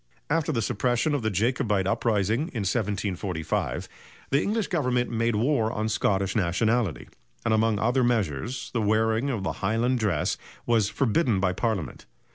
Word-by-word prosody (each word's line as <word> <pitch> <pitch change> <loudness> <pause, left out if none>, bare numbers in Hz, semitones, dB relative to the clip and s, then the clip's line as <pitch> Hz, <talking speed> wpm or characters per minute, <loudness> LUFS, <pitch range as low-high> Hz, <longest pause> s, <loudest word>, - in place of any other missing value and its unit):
After 160 0 +1
the 115 -6 0
suppression 120 +9 0
of 145 - 0
the 110 - 0
Jacobite 105 -1 +1
uprising 105 +2 +1
of 165 - -11
1745, 95 - -2 0.4
the 140 - +3
English 215 0 0
Government 125 -9 0
made 115 0 +1
war 115 -1 +1
on 110 -1 -2
Scottish 95 -2 0
nationality, 110 +1 +1 0.4
and 115 - +2
among 110 -1 +2
other 120 +5 +2
measures 115 - -1
the 115 - 0
wearing 110 +4 +2
of 115 -7 -2
the - - -1
highland 115 +5 +1
dress 95 -9 0 0.3
was 115 -4 +2
forbidden 120 - +1
by 95 -1 +1
Parliament. 100 -4 -3
110 Hz, 150 wpm, -26 LUFS, 100-125 Hz, 0.4 s, the